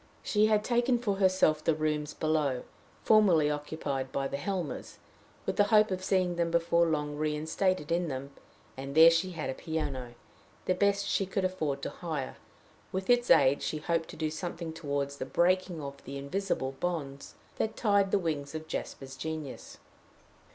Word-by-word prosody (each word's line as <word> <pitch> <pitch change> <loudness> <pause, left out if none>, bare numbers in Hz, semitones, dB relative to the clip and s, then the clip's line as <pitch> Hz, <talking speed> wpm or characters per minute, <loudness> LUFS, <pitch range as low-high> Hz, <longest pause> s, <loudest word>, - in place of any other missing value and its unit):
She 210 0 +3
had 215 -1 +3
taken 240 +2 +2
for 210 -5 -1
herself 185 -5 +3
the 160 - +2
rooms 150 -1 -1
below, 150 -5 0 0.4
formerly 180 -9 +5
occupied 145 -3 -3
by 135 0 -1
the 140 - -4
Helmers, 180 +1 -4 0.5
with - - -2
the 205 - +5
hope 210 0 +4
of 185 0 -2
seeing 185 -2 +1
them 170 -1 +1
before 170 0 +3
long 150 -2 -1
reinstated 155 +2 0
in 175 +1 +1
them; 135 -1 -5 0.4
and 135 +1 -6
there 165 +1 +9
she 175 +3 0
had 155 -5 -3
a - - -4
piano, 135 -6 -4 0.5
the 185 - +2
best 200 +1 +2
she 195 -1 0
could 190 0 -1
afford 155 -7 -2
to - - -3
hire: 155 -6 -5 0.5
with 190 +5 0
its 245 0 +3
aid 140 -2 +5
she 155 - -2
hoped 165 +1 -1
to - - -8
do 155 -1 -2
something 165 0 -5
toward 140 -3 -2
the 140 - -5
breaking 180 +2 +1
of 140 0 -8
the 140 +2 -6
invisible 140 -1 -2
bonds 145 -6 -4 0.2
that 220 0 -2
tied 200 -3 +3
the 205 - +3
wings 155 -5 -3
of 155 0 -6
Jasper's 135 -3 -5
genius. 155 -3 -6
160 Hz, 170 wpm, -30 LUFS, 145-185 Hz, 0.5 s, there